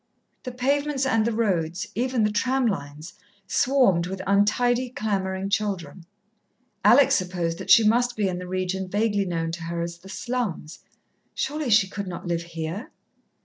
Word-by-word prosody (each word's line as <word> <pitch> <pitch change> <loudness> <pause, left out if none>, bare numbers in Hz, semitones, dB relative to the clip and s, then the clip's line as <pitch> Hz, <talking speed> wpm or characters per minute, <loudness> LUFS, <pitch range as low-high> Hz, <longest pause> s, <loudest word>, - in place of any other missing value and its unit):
The 255 - -4
pavements 275 +2 0
and 225 -4 +2
the - - +1
road, 180 -7 0 0.2
even 245 0 0
the 210 - +2
tram 260 +4 +1
lines, 150 -4 -4 0.3
swarmed 195 -8 +2
with 190 +1 -5
untidy, 240 +6 +2
clamouring 195 -4 -2
children. 185 -6 -2 0.8
Alex 270 +2 +6
supposed 175 -3 -1
that - - -8
she 230 - +8
must 245 +2 +2
be 210 -2 0
in 180 -1 -3
the 180 - -7
region 185 +1 -2
vaguely 205 0 0
known 165 -2 -2
to 165 0 -6
her 170 0 -4
as 170 0 -6
the 195 - -14
slums. 225 -9 -4 0.6
Surely 300 -2 -2
she 210 -3 +5
could 200 0 -6
not 180 0 -6
live 170 -1 -1
here? 170 +5 -6
200 Hz, 160 wpm, -25 LUFS, 175-240 Hz, 0.8 s, she